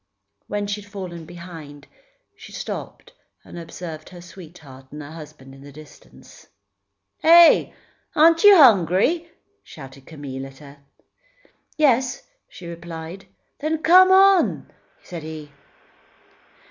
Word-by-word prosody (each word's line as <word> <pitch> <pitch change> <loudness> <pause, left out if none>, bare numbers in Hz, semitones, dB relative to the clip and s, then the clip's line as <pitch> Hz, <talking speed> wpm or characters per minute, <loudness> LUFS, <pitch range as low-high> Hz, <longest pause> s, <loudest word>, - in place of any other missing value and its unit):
When 205 0 -3
she 205 +1 -5
had 205 - -18
fallen 180 -5 -8
behind, 165 -5 -12 0.5
she - - -14
stopped - - -8 0.3
and 175 - -10
observed 165 -2 -9
her 180 - -13
sweetheart 160 -7 -14
and 150 +1 -9
husband 145 -3 -13
in 135 - -16
the 140 +1 -13
distance. 150 +1 -17 0.7
"Heh! 335 +1 +6 0.4
Aren't 330 +3 +4
you 410 -2 +8
hungry?" 245 - +3 0.3
shouted 135 -2 -14
Camille 135 -4 -8
at 135 0 -16
her. 145 0 -15 1.0
"Yes," 260 -3 +1 0.3
she 175 - -13
replied. 170 +2 -9 0.3
"Then, 310 +1 -3
come 370 +3 +6
on!" 385 -1 +3 0.3
said 175 -3 -9
he. 155 -1 -10
170 Hz, 115 wpm, -21 LUFS, -, 1.0 s, you